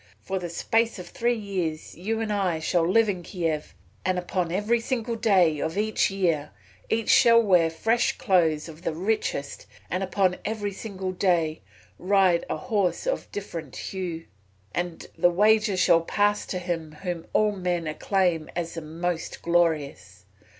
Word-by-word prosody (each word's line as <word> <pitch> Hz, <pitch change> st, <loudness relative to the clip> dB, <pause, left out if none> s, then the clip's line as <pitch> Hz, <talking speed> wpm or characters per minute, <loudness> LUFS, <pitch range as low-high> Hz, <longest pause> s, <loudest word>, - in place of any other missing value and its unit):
For 190 Hz, -, -2 dB
the 175 Hz, -1 st, -5 dB
space 225 Hz, +7 st, 0 dB
of 180 Hz, -, -9 dB
three 240 Hz, 0 st, 0 dB
years 185 Hz, -7 st, -4 dB
you 220 Hz, +6 st, -2 dB
and 215 Hz, -2 st, -1 dB
I 190 Hz, -5 st, 0 dB
shall 165 Hz, +1 st, +1 dB
live 225 Hz, +3 st, +4 dB
in 185 Hz, -3 st, -2 dB
Kiev, 165 Hz, -4 st, -3 dB, 0.3 s
and 185 Hz, +1 st, 0 dB
upon 180 Hz, -1 st, -2 dB
every 210 Hz, +6 st, +1 dB
single 235 Hz, -1 st, -2 dB
day 185 Hz, -9 st, +3 dB
of 160 Hz, +3 st, -2 dB
the 215 Hz, +2 st, -1 dB, 0.2 s
year 175 Hz, -7 st, 0 dB, 0.4 s
each 225 Hz, -1 st, +1 dB
shall 230 Hz, -2 st, +7 dB
wear 180 Hz, -7 st, +4 dB
fresh 225 Hz, +9 st, +1 dB
clothes 170 Hz, -9 st, +2 dB
of 160 Hz, 0 st, -11 dB
the 165 Hz, -, -2 dB
richest, 175 Hz, -7 st, -2 dB, 0.2 s
and 185 Hz, -, -1 dB
upon 190 Hz, -1 st, +1 dB
every 210 Hz, -2 st, -2 dB
single 190 Hz, -2 st, -5 dB
day 175 Hz, -4 st, +1 dB, 0.4 s
ride 185 Hz, -2 st, +3 dB
a -, -, -1 dB
horse 210 Hz, -, -1 dB
of -, -, -1 dB
a -, -, -32 dB
different 165 Hz, -8 st, -6 dB
hue. 175 Hz, -4 st, -5 dB, 0.5 s
And 175 Hz, -1 st, -3 dB
the 175 Hz, -, +5 dB
wager 210 Hz, +2 st, +3 dB
shall 170 Hz, -2 st, +5 dB
pass 205 Hz, +4 st, +1 dB
to 185 Hz, -, -3 dB
him 170 Hz, -3 st, -4 dB
whom 175 Hz, -3 st, -4 dB
all 215 Hz, -1 st, +3 dB
men 180 Hz, -4 st, -2 dB
acclaim 165 Hz, 0 st, 0 dB
as 170 Hz, -1 st, -3 dB
the 165 Hz, -, -5 dB
most 165 Hz, +2 st, -4 dB
glorious. 150 Hz, -, 0 dB
180 Hz, 165 wpm, -26 LUFS, 165-205 Hz, 0.5 s, shall